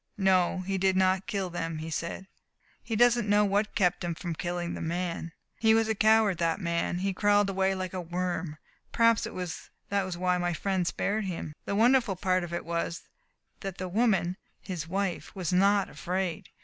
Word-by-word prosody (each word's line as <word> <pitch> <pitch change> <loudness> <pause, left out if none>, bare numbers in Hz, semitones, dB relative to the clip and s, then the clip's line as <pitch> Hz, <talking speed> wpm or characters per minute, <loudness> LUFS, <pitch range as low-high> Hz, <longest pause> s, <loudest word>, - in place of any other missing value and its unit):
"No, 190 -2 +3
he 190 +1 -2
did 190 0 +2
not 185 0 +2
kill 190 0 -2
them," 165 -2 -3
he 160 +1 -6
said. 170 +4 -4 0.6
"He 225 - -4
doesn't 240 -1 +4
know 210 0 +5
what 205 +2 0
kept 180 -3 +2
him 170 -1 -2
from 170 0 -4
killing 175 +1 -3
the - - -5
man. 170 0 -3 0.3
He 220 -1 +5
was 225 0 +3
a 220 - +1
coward, 215 -3 +4
that 165 +1 +1
man. 170 -1 -1
He 195 +1 -1
crawled 205 0 +3
away 190 0 +1
like 185 -1 -4
a 185 - -3
worm. 175 -2 -3 0.3
Perhaps 230 -1 +3
that 230 - -5 0.7
was 185 -2 -4
why 180 0 +1
my 175 0 0
friend 185 +1 -1
spared 210 +3 -1
him. 165 -4 -5
The 200 - -2
wonderful 235 -2 +4
part 185 -1 +1
of 175 - -6
it 170 - -3
was 170 0 -3 0.6
that 195 -2 -6
the 185 - -4
woman 190 -3 +1 0.2
his 175 -4 -5
wife 190 +1 -3
was 185 -2 -2
not 200 +2 +4
afraid. 180 -2 -3
185 Hz, 190 wpm, -28 LUFS, 175-200 Hz, 0.7 s, know